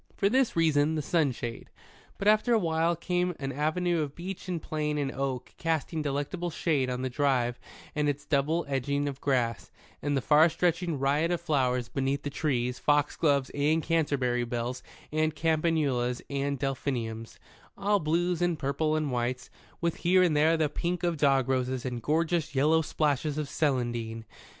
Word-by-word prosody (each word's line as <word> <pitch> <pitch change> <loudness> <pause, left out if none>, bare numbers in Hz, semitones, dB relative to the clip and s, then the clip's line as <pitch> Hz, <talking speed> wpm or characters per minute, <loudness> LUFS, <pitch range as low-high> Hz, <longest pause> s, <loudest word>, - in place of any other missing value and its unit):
For 200 - +3
this 260 +1 +2
reason, 160 -2 +3
the 155 - -2
sunshade. 135 -8 -1 0.5
But 200 - -2
after 215 +3 +4
a - - +5
while 165 -2 +1
came 180 +1 -1
an 135 -1 -3
avenue 160 +4 0
of 145 -2 -4
beech 185 +2 -7
and 180 -2 -2
plane 150 -1 -2
and 140 -2 -1
oak 135 -2 -3
casting 160 -1 -1
delectable 145 +5 -2
shade 150 -5 0
on 125 0 -3
the - - 0
drive 125 -3 +1 0.3
and 150 -1 +1
its 145 0 -3
double 155 +4 +1
edging 140 +1 -1
of 140 -1 -5
grass, 125 -5 0 0.3
and 145 0 0
the - - 0
far 155 +5 +5
stretching 170 -1 0
riot 145 +5 +1
of 175 -1 0
flowers 130 -7 0
beneath 135 +2 -1
the 145 - -3
trees, 125 -5 -1
foxgloves 145 -1 +2
and 150 +3 +1
canterbury 140 -7 +1
bells 120 +1 -3 0.3
and 155 0 0
campanulas 155 -7 +1
and 140 0 -1
delphiniums, 120 -4 -3 0.4
all 205 +1 +2
blues 175 +2 0
and 175 -2 +1
purples 155 +3 0
and 150 -3 -1
whites, 125 +1 -2 0.3
with 170 -1 0
here 185 +1 +4
and 170 -4 +2
there 160 +2 +4
the 155 -1 +2
pink 175 +4 -3
of 175 -1 +1
dog 135 -3 +3
roses 130 -1 -1
and 125 -2 -3
gorgeous 160 +2 0
yellow 155 +4 +4
splashes 150 -1 0
of 150 -2 -2
celandine. 120 -6 -1
145 Hz, 170 wpm, -28 LUFS, 130-165 Hz, 0.5 s, a